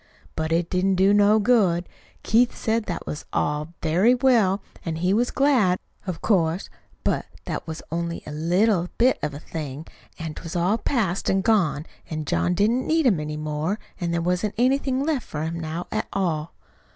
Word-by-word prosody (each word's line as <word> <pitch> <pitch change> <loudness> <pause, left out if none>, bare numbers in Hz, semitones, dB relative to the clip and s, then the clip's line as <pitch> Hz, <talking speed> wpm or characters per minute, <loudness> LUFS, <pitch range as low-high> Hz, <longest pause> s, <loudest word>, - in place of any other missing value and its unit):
"But 160 0 -2
it 165 +1 +2
didn't 190 +2 +1
do 190 +2 +4
no 205 +1 +5
good. 200 -6 +3 0.4
Keith 235 +3 +3
said 225 0 0
that 175 - -4
was 150 - -5
all 150 +3 -1
very 180 +10 +4
well, 225 -7 +3 0.2
an' 165 -2 -3
he 180 +4 +1
was 240 +4 +2
glad, 250 -10 +3 0.3
of 175 -3 -4
course; 175 -3 +1 0.3
but - - 0 0.2
that - - -4
was 160 0 -6
only 170 0 -3
a - - -7
little 175 +4 +2
bit 255 +2 +3
of 150 -2 -3
a - - -6
thing, 150 -2 -6 0.3
an' 160 -1 -5
't - - -9
was 165 - -7
all 180 +6 +2
past 205 -10 0
an' 195 0 +2
gone, 190 -8 +2 0.2
an' 155 -1 -4
John 175 +4 +1
didn't 225 +7 +2
need 320 -1 +2
'em 205 -10 +4
any 150 0 -4
more, 155 +5 -2 0.2
an' 175 -2 -1
there 170 0 0
wasn't 180 +4 0
anything 265 +2 +2
left 300 -6 -1
for 150 0 -4
him 165 +1 -3
now 165 +2 -4
at - - -1
all. 165 -5 -2
180 Hz, 190 wpm, -24 LUFS, 160-220 Hz, 0.4 s, no